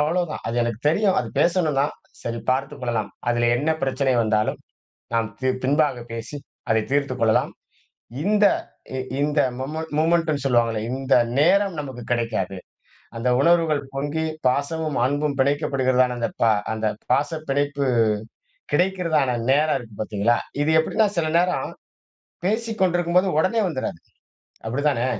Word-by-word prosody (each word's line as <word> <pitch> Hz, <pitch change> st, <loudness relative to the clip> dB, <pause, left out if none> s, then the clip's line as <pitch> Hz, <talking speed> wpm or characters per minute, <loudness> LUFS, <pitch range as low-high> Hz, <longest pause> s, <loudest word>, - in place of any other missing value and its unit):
அவ்வளவுதான். 160 Hz, +2 st, -1 dB
அது 115 Hz, -, -3 dB
எனக்கு 115 Hz, -1 st, -3 dB
தெரியும். 195 Hz, +4 st, +2 dB
அது -, -, -5 dB
பேசணும்தான், 155 Hz, -5 st, +2 dB, 0.3 s
சரி 115 Hz, 0 st, -3 dB
பார்த்துக் 135 Hz, +2 st, -2 dB
கொள்ளலாம். 115 Hz, -4 st, -2 dB, 0.2 s
அதிலே 120 Hz, 0 st, +2 dB
என்ன 150 Hz, +6 st, 0 dB
பிரச்சனை 135 Hz, 0 st, +1 dB
வந்தாலும், 110 Hz, -1 st, 0 dB, 0.5 s
நாம் 115 Hz, -1 st, +1 dB
தீர் 130 Hz, 0 st, 0 dB
பின்பாக 140 Hz, -2 st, +2 dB
பேசி, 115 Hz, +5 st, -6 dB, 0.3 s
அதை 110 Hz, 0 st, +3 dB
தீர்த்துக் 140 Hz, -3 st, 0 dB
கொள்ளலாம். 110 Hz, -1 st, +3 dB, 0.7 s
இந்த 210 Hz, 0 st, +3 dB, 0.5 s
இ -, -, -2 dB, 0.2 s
இந்த 145 Hz, +1 st, +2 dB, 0.2 s
மொமென் 155 Hz, +5 st, -4 dB
மொமென்டுன்னு 160 Hz, -2 st, +2 dB
சொல்லுவாங்கள்ல. 115 Hz, -4 st, +2 dB
இந்த 135 Hz, +1 st, -3 dB, 0.3 s
நேரம் 190 Hz, +4 st, +3 dB
நமக்கு 130 Hz, -4 st, -7 dB
கிடைக்காது. 110 Hz, -5 st, -1 dB, 0.6 s
அந்த 120 Hz, +2 st, 0 dB
உணர்வுகள் 165 Hz, -1 st, +3 dB
பொங்கி 145 Hz, +3 st, -2 dB, 0.2 s
பாசமும், 145 Hz, +3 st, -1 dB
அன்பும் 145 Hz, +1 st, 0 dB
பிணைக்கப்படுகிறதான, 130 Hz, -3 st, +2 dB
அந்த 115 Hz, -, -1 dB
பா 115 Hz, -, +5 dB, 0.2 s
அந்த 110 Hz, 0 st, -1 dB, 0.2 s
பாச 145 Hz, -, +2 dB, 0.2 s
பிணைப்பு 140 Hz, 0 st, 0 dB, 0.9 s
கிடைக்கிறதான 170 Hz, -9 st, +1 dB
நேரம் 150 Hz, +1 st, +3 dB
இருக்கு 115 Hz, -4 st, -12 dB
பார்த்தீங்களா! 110 Hz, +2 st, +1 dB, 0.3 s
இது 150 Hz, -, 0 dB
எப்பிடின்னா, 215 Hz, +7 st, +2 dB
சில 165 Hz, -2 st, +1 dB
நேரம் 180 Hz, -6 st, 0 dB, 0.7 s
பேசிக்கொண்டிருக்கும்போது 185 Hz, -4 st, +1 dB
உடனே 190 Hz, +7 st, +2 dB
வந்துறாது. 130 Hz, -, -4 dB, 0.7 s
அப்படித்தானே? 130 Hz, +1 st, 0 dB
140 Hz, 125 wpm, -23 LUFS, 120-160 Hz, 0.9 s, பா